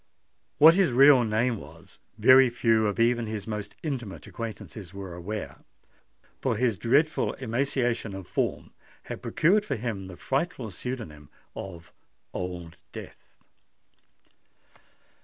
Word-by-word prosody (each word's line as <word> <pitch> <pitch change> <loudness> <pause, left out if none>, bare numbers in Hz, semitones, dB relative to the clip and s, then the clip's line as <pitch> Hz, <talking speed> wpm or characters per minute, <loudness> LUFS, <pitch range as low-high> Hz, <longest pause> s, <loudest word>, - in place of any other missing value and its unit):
What 160 +3 +9
his 185 -5 +3
real 135 +1 +7
name 115 +2 +1
was, 85 +3 -14 0.2
very 130 +3 +7
few 115 -2 +2
of 105 - -2
even 120 0 +2
his 105 -2 -4
most 105 -2 -5
intimate 125 -10 -4
acquaintances 105 -4 -8
were 95 -3 -7
aware; 100 +5 -6 0.8
for 130 -4 0
his 115 -4 +1
dreadful 145 +7 +2
emaciation 120 -3 -1
of 95 -1 -7
form - - -2 0.3
had - - -7
procured 200 +7 +3
for 140 - -2
him 110 -5 -4
the 90 -2 -10
frightful 135 - -2
pseudonym 90 - -7 0.3
of 85 -4 -9 0.4
Old 90 -2 -5
Death. - - -11
115 Hz, 120 wpm, -27 LUFS, 95-130 Hz, 0.8 s, What